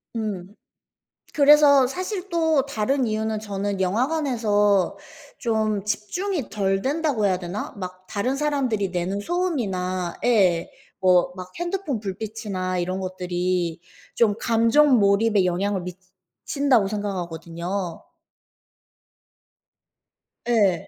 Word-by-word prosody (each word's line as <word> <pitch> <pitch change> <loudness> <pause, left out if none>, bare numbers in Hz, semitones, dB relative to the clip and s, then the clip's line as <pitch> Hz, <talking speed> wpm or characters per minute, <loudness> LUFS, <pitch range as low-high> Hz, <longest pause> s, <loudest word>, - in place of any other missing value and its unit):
음. 205 -3 -4 0.8
그래서 285 -2 +6
사실 370 +5 -4
또 320 -5 +2
다른 265 0 0
이유는 220 0 -1
저는 200 -1 -3
영화관에서 210 - +1 0.4
좀 215 -4 0
집중이 270 - -2
덜 195 -2 0
된다고 280 -4 0
해야 185 -2 +1
되나? 185 +3 -5
막 185 -1 -8
다른 250 +7 -1
사람들이 265 -9 0
내는 180 +2 -2
소음이나 195 - -2
예. 185 -8 +3 0.3
뭐 180 -1 +4
막 185 0 -8
핸드폰 345 - -2
불빛이나 195 -2 -4
이런 185 +2 -2
것들이 180 -2 -2 0.3
좀 210 -3 +3
감정 235 +4 +4
몰입에 200 0 +3
영향을 185 +2 0 0.6
미친다고 275 -8 +2
생각하거든요. 175 -2 -4 2.5
예. 200 -8 +2
205 Hz, 225 characters per minute, -23 LUFS, 185-260 Hz, 2.5 s, 그래서